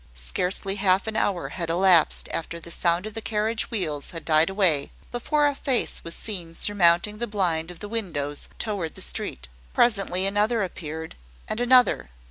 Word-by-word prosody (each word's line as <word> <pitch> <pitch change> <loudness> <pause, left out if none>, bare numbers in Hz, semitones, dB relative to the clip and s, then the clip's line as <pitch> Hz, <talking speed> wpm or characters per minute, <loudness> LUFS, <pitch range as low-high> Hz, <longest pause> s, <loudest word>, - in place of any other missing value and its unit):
Scarcely 180 - -2
half 195 -1 +2
an 220 -1 -3
hour 200 -5 0
had 170 -3 -5
elapsed 175 -1 +4
after 170 +1 -4
the 170 +1 -6
sound 170 +2 0
of 215 - -6
the 225 - -5
carriage 220 +1 0
wheels 155 - -3
had 165 -1 -7
died 155 +1 +4
away, 185 -8 +2 0.2
before 295 +5 +1
a 290 - +2
face 265 -3 0
was 165 - -3
seen 175 -6 -5
surmounting 200 +1 +3
the 240 - -2
blind 175 -6 -1
of 180 - -10
the 205 - -5
windows 160 -10 -4
towards 200 -8 -3
the - - -7
street. 60 0 -3 0.3
Presently 195 -5 +2
another 210 +3 +1
appeared, 160 -3 -6 0.3
and 215 - -3
another. 245 - +4
190 Hz, 170 wpm, -25 LUFS, 165-215 Hz, 0.3 s, elapsed